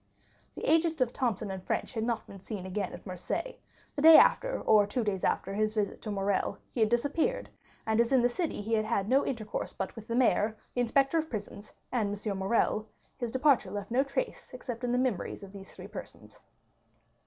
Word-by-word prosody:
The - - -8
agent 325 0 +3
of 250 -2 +1
Thomson 205 -6 -2
& - - -26
French - - -1
had 220 -2 -2
not 230 -1 -1
been 200 - -11 0.2
again 190 +1 -3
seen - - -12
at 175 - -13
Marseilles; 185 - -4 0.4
the 285 - -2
day 320 +1 +10
after, - - +4
or 210 -2 +4
two 235 +4 -1
days 200 -3 -2
after 195 - 0
his 215 +1 0
visit 210 -2 -1
to 215 - -6
Morrel, 200 -1 0
he - - -5
had 220 -1 +4
disappeared; 295 - 0 0.3
and 220 +1 +3
as 235 - 0
in 260 -3 +4
that 245 - +4
city 320 - -2
he 220 +2 -3
had 215 -1 +2
had 200 -2 0
no 265 +4 +4
intercourse 220 -5 -4
but - - -4
with 225 -2 -10
the 230 - -2
mayor, 220 -3 +2 0.2
the 245 - 0
inspector 275 +6 +2
of 315 0 -3
prisons, 205 -1 -7 0.2
and 205 -5 -1
M. 200 -2 -1
Morrel, 215 +2 +1 0.3
his 240 -3 -3
departure 260 -6 +3
left 205 +3 -6
no 250 +3 +4
trace 280 - -4
except 245 -1 -6
in 245 - 0
the 245 - +2
memories 250 -7 -1
of 195 - -10
these 195 -1 -11
three - - -9
persons. - - -10
225 Hz, 210 wpm, -30 LUFS, 205-260 Hz, 0.4 s, day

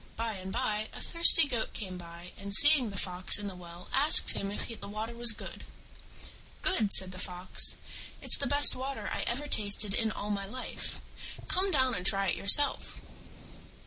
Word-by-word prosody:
By 225 0 -6
and 190 0 -11
by 215 -3 -5
a - - -12
thirsty 335 -2 +4
Goat 240 -5 -6
came 185 -4 -9
by, 170 +1 -14
and 200 0 -11
seeing 280 +2 +6
the 200 - -10
Fox 180 -1 +1
in 205 - -7
the 200 - -8
well 175 0 -15
asked 290 +4 +8
him 195 - -6
if 205 - -8
the - - -10
water 215 +3 -9
was 235 0 +1
good. 210 - -12 1.0
"Good?" 225 - -2
said 185 -1 +5
the 185 - -12
Fox, 180 -1 +1 0.4
"it's - - -1
the - - -4
best 285 0 +3
water 265 +1 -8
I - - -6
ever 270 +5 -6
tasted 205 -4 0
in 220 +1 -3
all 210 -1 -8
my 200 -1 -6
life. 255 +5 -10 0.5
Come 380 +2 -2
down 260 -7 -2
and 180 - -6
try 195 0 -2
it - - -3
yourself." 285 +9 0
210 Hz, 185 wpm, -27 LUFS, 190-255 Hz, 1.0 s, asked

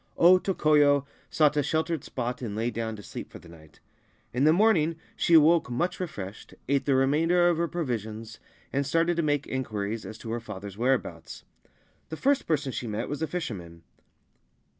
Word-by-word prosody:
O 180 +2 +7
Tokoyo 150 -6 +3 0.2
sought 150 -2 +3
a - - +4
sheltered 160 +1 -1
spot, 125 0 -4
and 110 -5 -4
lay 115 +3 -1
down 110 -1 -3
to 105 - -11
sleep - - -8
for - - -9
the - - -16
night. 80 -3 -16 0.5
In 130 +4 +2
the 155 - +6
morning 170 -4 +3 0.2
she 170 - +3
awoke 160 -1 +5
much 170 +9 -1
refreshed, 105 - -7
ate 140 +1 +1
the 140 - +2
remainder 165 +7 +3
of 170 - +1
her 170 +1 0
provisions, 115 - -4 0.3
and 140 - +1
started 165 +5 +1
to - - +2
make 145 -2 0
inquiries 110 -4 -3
as 110 - -8
to 115 0 -7
her 120 - -2
father's 100 -3 -8
whereabouts. 115 -8 -2 0.7
The 160 - -6
first 280 - +1
person 150 -4 0
she 120 - -4
met 110 +2 -3
was 145 +2 -4
a 160 - 0
fisherman. 95 - -6
140 Hz, 180 wpm, -27 LUFS, 110-160 Hz, 0.7 s, O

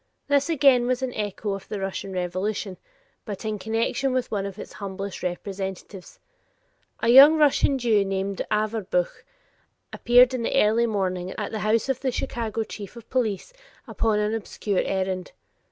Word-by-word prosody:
This 285 +2 +2
again 270 -6 +4
was 255 +1 0
an 255 -1 -2
echo 205 0 -3
of 195 -1 -7
the 210 - -4
Russian 195 0 -4
revolution, 185 +2 -3 0.5
but 205 0 -7
in 215 -1 -2
connection 225 +6 -1
with 255 -1 -1
one 200 -2 -1
of 195 0 -9
its - - -9
humblest 195 -1 -6
representatives. 190 +1 -6 0.8
A 230 - +1
young 275 +6 +9
Russian 290 -2 +3
Jew 225 -5 +2
named 195 0 -2
Averbuch 210 -4 -1 0.7
appeared 245 +1 +5
in 255 - -2
the 250 - +1
early 225 +3 +3
morning 185 -3 -2
at - - -4
the 220 - -3
house 215 +3 +1
of 265 -2 -1
the 265 - -1
Chicago 225 -2 -3
chief 205 0 -9
of 235 -2 -13
police 235 - -1 0.3
upon 220 -2 0
an 210 +1 0
obscure 205 -2 -2
errand. 185 -1 -2
215 Hz, 160 wpm, -25 LUFS, 195-240 Hz, 0.8 s, young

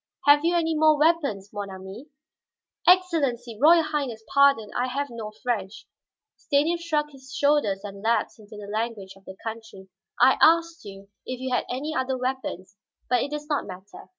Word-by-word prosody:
"Have 290 +1 +6
you 340 +1 +2
any 325 -1 +1
more 310 0 +4
weapons, 285 - +1
mon 205 -1 -5
ami?" 190 +7 -10 0.8
"Excellency, 280 - +2
Royal 330 +2 +6
Highness, 270 -8 -3
pardon 280 -6 +4
I 250 +1 0
have 280 +1 -3
no 225 -2 -7
French." 215 -5 -3 0.5
Stanief 320 +4 0
shrugged 300 -3 -1
his 265 -1 -15
shoulders 280 -11 +1
and 200 -1 -8
lapsed 230 +1 0
into 210 0 -13
the 205 - -8
language 215 -2 -4
of 195 0 -21
the 190 - -10
country. 220 -4 -8 0.3
"I 260 +2 +5
asked 330 -2 +3
you 195 0 -11 0.2
if 255 -1 -5
you 260 0 -3
had - - 0 0.3
other 260 0 -1
weapons, 250 -7 -4 0.3
but 250 - +3
it - - -2
does 300 0 -5
not 295 -2 -1
matter." 190 +1 -11
255 Hz, 170 wpm, -25 LUFS, 205-295 Hz, 0.8 s, Have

